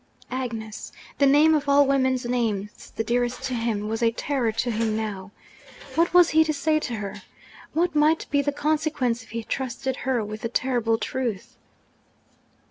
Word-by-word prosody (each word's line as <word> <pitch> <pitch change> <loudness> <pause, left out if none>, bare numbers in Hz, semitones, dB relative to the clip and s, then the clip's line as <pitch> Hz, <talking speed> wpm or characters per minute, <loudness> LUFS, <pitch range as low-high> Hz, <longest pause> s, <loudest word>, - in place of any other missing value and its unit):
Agnes! 230 -4 -5 0.3
The 280 - +5
name, 295 +3 +6
of 295 -2 0
all 285 0 +6
women's 260 -2 +1
names 220 -5 -2
the 225 - -1
dearest 245 +2 -1
to 265 -1 -2
him, 225 -3 -1
was 225 +2 -3
a 230 - +4
terror 245 0 -1
to 235 +2 -1
him 220 -1 0
now! 200 -4 -4 0.6
What 335 +1 +2
was 355 -1 +6
he 320 +1 +5
to 315 - -1
say 310 +2 +1
to 245 -6 -4
her? 200 -2 -6 0.5
What 340 +2 +1
might 305 +2 +3
be 285 - +3
the 285 +1 0
consequence 290 -5 0
if 225 - -16
he 230 +1 -4
trusted 260 +2 -3
her 245 -4 -1
with 215 +1 -7
the 230 - -2
terrible 240 -2 +1
truth? 235 -5 -4
250 Hz, 175 wpm, -25 LUFS, 225-285 Hz, 0.6 s, name